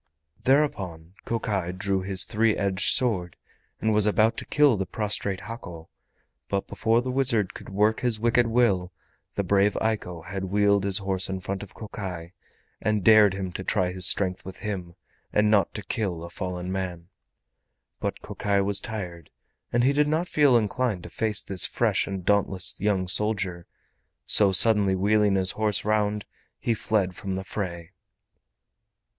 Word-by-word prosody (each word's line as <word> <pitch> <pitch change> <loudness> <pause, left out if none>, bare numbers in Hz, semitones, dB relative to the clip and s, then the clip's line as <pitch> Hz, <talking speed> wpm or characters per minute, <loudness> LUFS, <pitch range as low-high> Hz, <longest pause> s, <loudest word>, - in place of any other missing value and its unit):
Thereupon 95 - 0
Kokai 100 -6 -2
drew 95 +1 -1
his 95 0 +3
three 110 -1 +1
edged 100 -1 +2
sword 95 -9 +1 0.4
and 110 0 +1
was 105 0 +3
about 110 +2 +3
to - - -6
kill 145 -4 +4
the 95 -2 -3
prostrate 100 -1 -2
Hako, 95 -6 -9 0.6
but 100 -1 -1
before 115 +2 +1
the 130 - -3
wizard 120 -7 0
could - - -11
work 105 +3 +1
his 120 -3 0
wicked 120 +1 +2
will 110 -7 +1 0.4
the 100 - -1
brave 100 +2 +2
Eiko 95 -7 -3
had 95 +1 -5
wheeled 100 +1 +2
his 100 -1 +5
horse 95 -2 0
in 95 0 -3
front 95 +1 -5
of 100 - -11
Kokai 90 -6 -7 0.5
and 105 -2 0
dared 105 -2 +6
him 95 -2 -4
to 95 - -6
try 95 -2 0
his 90 0 +2
strength 95 -2 +2
with 95 0 -9
him, 90 -5 -5 0.4
and 105 0 +2
not 100 -5 +3
to 105 - -5
kill 95 -8 -3
a 85 - -9
fallen 90 -1 -5
man. 90 -2 -5 0.9
But - - -4
Kokai 100 -1 -1
was 100 0 +2
tired, 90 -8 -7 0.4
and 120 0 +2
he 135 +3 +3
did 150 +1 +2
not 160 +4 0
feel 145 -7 +4
inclined 110 -3 -1
to - - -10
face 110 -2 -1
this 95 -3 0
fresh - - 0
and 95 -2 -5
dauntless 100 -2 +1
young 95 -3 0
soldier, 95 -3 -1 0.6
so 100 -2 +5
suddenly 100 0 +6
wheeling 105 +1 +2
his 95 -1 +3
horse 105 -2 -1
round, 105 -1 0 0.3
he 115 - 0
fled 105 -4 -1
from 95 -2 -5
the 95 - -4
fray. 85 -4 -6
100 Hz, 165 wpm, -25 LUFS, 95-110 Hz, 0.9 s, dared